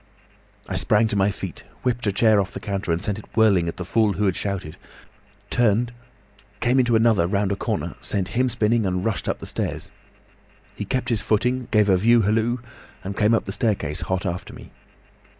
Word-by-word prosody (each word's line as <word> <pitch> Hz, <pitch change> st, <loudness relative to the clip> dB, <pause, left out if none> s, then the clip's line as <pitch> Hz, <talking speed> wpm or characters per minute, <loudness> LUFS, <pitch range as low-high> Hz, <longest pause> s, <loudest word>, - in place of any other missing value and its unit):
"I -, -, -3 dB
sprang 110 Hz, +1 st, +3 dB
to 105 Hz, -, -1 dB
my 100 Hz, 0 st, +3 dB
feet, 100 Hz, -, -6 dB, 0.2 s
whipped 120 Hz, -2 st, -1 dB
a -, -, +3 dB
chair 105 Hz, +1 st, +4 dB
off 95 Hz, -, -6 dB
the -, -, -4 dB
counter, 100 Hz, -3 st, -3 dB
and 85 Hz, -, +1 dB
sent 105 Hz, +2 st, -3 dB
it -, -, -14 dB
whirling 100 Hz, -6 st, +4 dB
at 85 Hz, -, -4 dB
the 90 Hz, -, -5 dB
fool 110 Hz, +2 st, +2 dB
who 105 Hz, +2 st, -1 dB
had 95 Hz, -2 st, +1 dB
shouted, 95 Hz, -6 st, -3 dB, 0.8 s
turned, 120 Hz, 0 st, +2 dB, 0.7 s
came 125 Hz, +2 st, +2 dB
into 120 Hz, -2 st, +3 dB
another 110 Hz, -6 st, +3 dB
round 100 Hz, +1 st, 0 dB
a -, -, +1 dB
corner, -, -, -3 dB
sent 95 Hz, -3 st, -2 dB
him 125 Hz, +5 st, +1 dB
spinning, 115 Hz, -2 st, +1 dB
and 90 Hz, 0 st, -1 dB
rushed 110 Hz, -3 st, -1 dB
up -, -, -1 dB
the -, -, -9 dB
stairs. -, -, -3 dB, 0.8 s
He 105 Hz, -, -5 dB
kept 125 Hz, +3 st, -2 dB
his 115 Hz, -3 st, +1 dB
footing, 125 Hz, +4 st, 0 dB
gave 105 Hz, -2 st, +3 dB
a 95 Hz, -2 st, +4 dB
view 115 Hz, +4 st, +4 dB
hallo, 115 Hz, +4 st, +1 dB, 0.4 s
and 100 Hz, +1 st, -5 dB
came 105 Hz, +2 st, +3 dB
up -, -, -1 dB
the 95 Hz, -, -4 dB
staircase 95 Hz, -8 st, 0 dB
hot 95 Hz, 0 st, -2 dB
after 90 Hz, 0 st, -4 dB
me. -, -, -13 dB
105 Hz, 205 wpm, -23 LUFS, 95-115 Hz, 0.8 s, chair